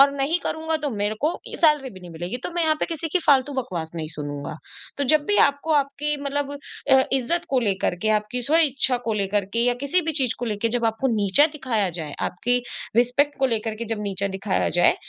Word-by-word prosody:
और 280 0 +7
नहीं 280 +5 +1
करूँगा 320 0 -1
तो 290 - -1
मेरे 205 +1 -1
को 305 +3 +1 0.2
सैलरी 300 -5 +2
भी 190 -4 -13
नहीं 175 -1 -11
मिलेगी, 175 +7 -5
तो 250 - -6
मैं 345 - +1
यहाँ 315 -1 +3
पे - - +1
किसी 330 -1 -4
की 370 - +3
फालतू 280 0 +4
बकवास 175 -11 -4
नहीं 160 -2 -4
सुनूँगा। 145 0 -5 0.4
तो 285 - +1
जब 300 +2 +4
भी 410 - +2
आपको 285 +3 -3
आपकी 290 +1 0
मतलब 285 0 -2 0.4
अ, 265 0 +7
इज़्ज़त 270 +6 0
को 265 -2 +2
लेकर 195 -6 0
के, 215 - +1
आपकी 215 +3 0
स्वइच्छा 280 -5 +3
को 225 - +1
लेकर 200 +1 0
के - - +2
या 245 - +3
किसी 320 +6 +3
भी 320 0 -1
चीज़ 255 -3 +2
को 245 - -3
लेके 210 +2 -1
जब 235 - -2
आपको 265 +5 -1
नीचा 205 +8 +5
दिखाया 230 -8 0
जाए, 160 -4 -6
आपकी 245 +8 +1 0.4
रिस्पेक्ट 250 +5 +2
को 265 - +4
लेकर 220 0 -4
के 230 +2 -5
जब 210 - -7
नीचा 200 -1 -1
दिखाया 195 0 0
जाए, - - +5
250 Hz, 225 wpm, -23 LUFS, 205-290 Hz, 0.4 s, और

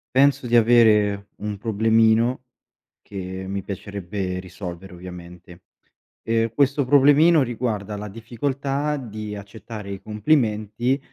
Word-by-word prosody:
Penso 135 -2 +3
di 120 - +3
avere 105 -4 +4
un 105 0 -5
problemino, 110 +3 +2 0.6
che 95 -1 -6
mi 100 0 -4
piacerebbe 100 -1 -5
risolvere 90 0 -8
ovviamente. 90 0 -11 0.6
Ehm, 115 0 0
questo 140 -1 +2
problemino 145 +4 +5
riguarda 115 -4 -3
la 105 +1 -6
difficoltà 135 +6 -2
di 105 -5 -6
accettare 100 0 -9
i 100 -1 -6
complimenti 110 +1 0
110 Hz, 110 wpm, -23 LUFS, 100-125 Hz, 0.6 s, problemino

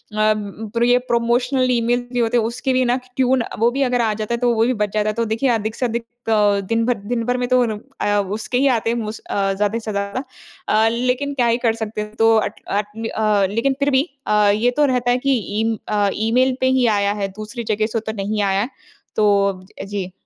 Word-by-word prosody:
प्र 215 +1 -1
ये 245 0 +5
promotional 245 +2 +1
email 240 0 +1
भी 245 - 0
होते 235 +1 +2
हैं, 230 - +2
उसके 250 +3 -1
लिए 255 0 +2
ना 245 +1 +2
क 255 - -9 0.2
टियून 260 -1 +2 0.2
वो 230 - +4
भी 275 +3 -2
अगर 250 -2 +1
आ 220 -2 +1
जाता 215 +2 -3
है, 235 - +1
तो 240 -1 +2
वो 225 +1 +3
भी 255 - +2
बच 205 -1 0
जाता 215 0 +1
है। - - -1
तो 230 - 0
देखिए, 225 +5 0
अधिक 220 -2 -1
से 255 - -1
अधिक 235 0 -2 0.6
दिन 230 0 +1
भर 245 -3 +1 0.2
दिन 230 -1 -1
भर 245 +1 0
में 245 0 -1
तो 255 0 +4
उन 235 -2 +1
उ 210 - -7 0.2
अ, 205 0 +2 0.2
उसके 235 +3 -2
ही 275 +2 +3
आते 225 - -2
हैं 235 - -1
मोस्ट 220 -1 -5
अ, 195 -1 +1
ज़्यादा 210 +3 0
से 220 -1 -5
ज़्यादा। 200 +6 -3 0.5
अ, 220 +1 +4
लेकिन 250 +4 -1
क्या 245 -4 +1
ही 230 +1 +2
कर 225 - +3
सकते 210 0 -4
हैं, 210 0 -8
तो 225 0 +4
अट 210 0 -2
अट 210 +2 -3 0.2
अ, 210 -2 +2
लेकिन 235 +5 +1
फिर 280 - +2
भी 265 +1 +4 0.2
अ, 210 -1 +4
ये 240 +4 +2
तो 295 - +5
रहता 250 -2 +1
है 245 - +3
कि 270 -2 +4 0.2
ईम 225 0 0
अ, 205 -1 +2
ईमेल 250 +4 +2
पे 260 - +3
ही 245 - +3
आया 200 0 +1
है, 195 - 0
दूसरी 230 +3 -6
जगह 215 +1 0
से 225 - +1
तो - - -9
नहीं 210 +1 -1
आया। 200 +4 +1 0.5
तो 210 - +3 0.2
अब 185 -1 -8
अ, - - -5
जी। 195 -2 -4
230 Hz, 250 wpm, -20 LUFS, 210-245 Hz, 0.6 s, ये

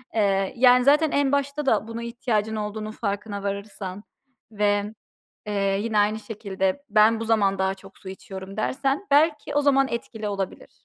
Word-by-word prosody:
Eee, 195 -2 +1
yani, 250 0 +6
zaten 295 +3 +4
en 285 -1 +2
başta 280 +1 -1
da 220 -4 +2
buna 230 +1 -6
ihtiyacın 230 -2 -1
olduğunun 215 0 -4
farkına 205 -1 -4
varırsan 200 -1 -5 0.5
ve, 205 0 0 0.5
eee, 195 -1 0
yine 220 -1 0
aynı 210 +1 +2
şekilde 200 +1 -3
ben 220 +1 +4
bu - - -2
zaman 205 -4 +2
daha 190 0 +1
çok 195 0 -16
su 190 - -11
içiyorum 190 0 -9
dersen 270 - -1
belki 300 +1 +3
o 290 - +4
zaman 275 -1 +3
etkili 225 -3 -4
olabilir. 195 -2 -5
215 Hz, 160 wpm, -24 LUFS, 200-250 Hz, 0.5 s, yani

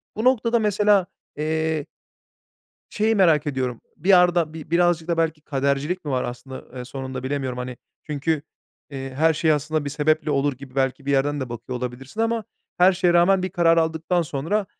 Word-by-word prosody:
Bu 220 - -3
noktada 235 -2 +3
mesela, 210 -2 +3 0.3
eee 155 0 -1 1.0
şeyi 220 +1 +1
merak 165 -7 +4
ediyorum, 130 -4 -2 0.2
bir 180 +6 -3
yarda 175 -4 +5
bi 160 -1 -9
birazcık 170 -1 +2
da 170 -1 0
belki 160 -2 0
kadercilik 140 +5 -1
mi 145 - -2
var 130 -1 0
aslında, 130 +2 -7
ııı, 125 -1 -10
sonunda 130 0 -6
bilemiyorum, 130 -2 -2
hani, 125 0 -5 0.3
çünkü, 150 +1 -1 0.5
eee, 135 -2 -6
her 160 +3 +3
şey 155 +1 +2
aslında 150 0 -1
bir - - -2
sebeple 150 +1 +1
olur 140 0 +1
gibi 130 0 -13
belki 135 0 -1
bir 140 - 0
yerden 145 +1 +1
de 130 -2 -4
bakıyor 120 +2 -5
olabilirsin 125 - -5
ama 230 0 0 0.3
her 185 +2 +6
şeye 175 -1 +2
rağmen 180 +2 +4
bir 185 - -1
karar 170 -3 +3
aldıktan 160 +2 +1
sonra 165 +7 -1
155 Hz, 180 wpm, -23 LUFS, 135-175 Hz, 1.0 s, her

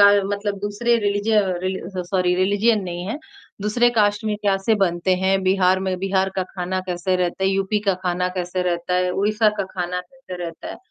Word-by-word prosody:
का - - +9 0.2
मतलब 205 0 -2
दूसरे 205 +4 +1
रिलिज 205 0 -1
अ, 215 - +6 0.2
रिल 190 0 -1 0.2
स 185 - -2
सॉरी 180 -2 +2
रिलिजन 205 +4 +2
नहीं 175 -1 -5
है, 225 +8 -3 0.4
दूसरे 240 +4 +3
कास्ट 205 -1 +2
में 215 -1 0
कैसे 195 +2 +2
बनते 185 -2 +1
हैं? 190 +1 +1
बिहार 185 0 +3
में 190 -1 -2
बिहार 190 0 +1
का 190 - +1
खाना 185 0 -4
कैसे 180 +1 0
रहता 180 +1 -1
है? - - +4
यूपी 195 +2 0
का 195 - +4
खाना 180 0 0
कैसे 180 +1 -2
रहता 175 0 -1
है? 180 0 +2
उड़ीसा 215 +3 +2
का 200 - 0
खाना 180 0 -2
कैसे 185 0 -11
रहता 165 -1 -7
है? - - -7
190 Hz, 205 wpm, -22 LUFS, 180-205 Hz, 0.4 s, का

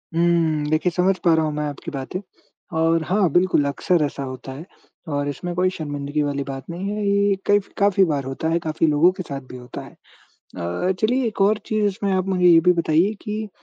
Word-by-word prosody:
हुँ। 165 -3 +2
देखिए 155 +3 +1
समझ 185 +2 +1
पा 170 - +6
रहा 160 -1 +2
हूँ 150 - -2
मैं 150 0 -2
आपकी 145 - -8
बातें 135 +6 -5 0.6
और 165 0 +2
हाँ 190 -2 +2
बिल्कुल 175 -4 +3
अक्सर 155 +3 +1
ऐसा 140 -1 -5
होता 130 0 -7
है। 145 +6 -8 0.5
और 145 0 -1
इसमें 175 +5 -5
कोई 185 +1 +2
शर्मिंदगी 145 -1 -3
वाली 140 -1 -2
बात 135 -1 -5
नहीं 180 +4 -4
हैं, 210 0 -3
ये 200 0 +2
कई 205 0 +4
फ़ 200 - -15
काफ़ी 200 -1 +4
बार 145 -4 -1
होता 135 +4 -4
है, 170 +1 +1
काफ़ी 160 0 0
लोगों 155 +4 +4
के 185 - -4
साथ 140 -3 -6
भी 125 - -8
होता 125 0 -8
है। - - -12 0.4
अ, 90 - -3
चलिए 245 +3 +2
एक 215 - -4
और 205 +2 +4
चीज़ 215 -1 0
इसमें 200 0 -1
आप 185 0 0
मुझे 180 -2 0
ये 165 -1 +8
भी 180 +2 +4
बताइए, 170 +3 +2
कि 215 +1 -5
170 Hz, 220 wpm, -22 LUFS, 145-190 Hz, 0.6 s, ये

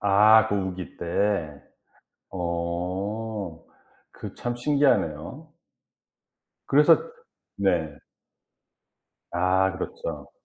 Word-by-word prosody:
아 105 +2 +6
그 - - 0
우기 95 -2 -4
때. 85 -4 -1 0.7
어. 90 +2 -4 0.5
그 - - -9
참 120 0 -3
신기하네요. 140 - 0 1.2
그래서 145 +2 +6 0.5
네. 85 -7 0 1.3
아 95 +2 +2
그렇죠. 475 +2 -6
95 Hz, 120 characters per minute, -25 LUFS, 85-110 Hz, 1.3 s, 아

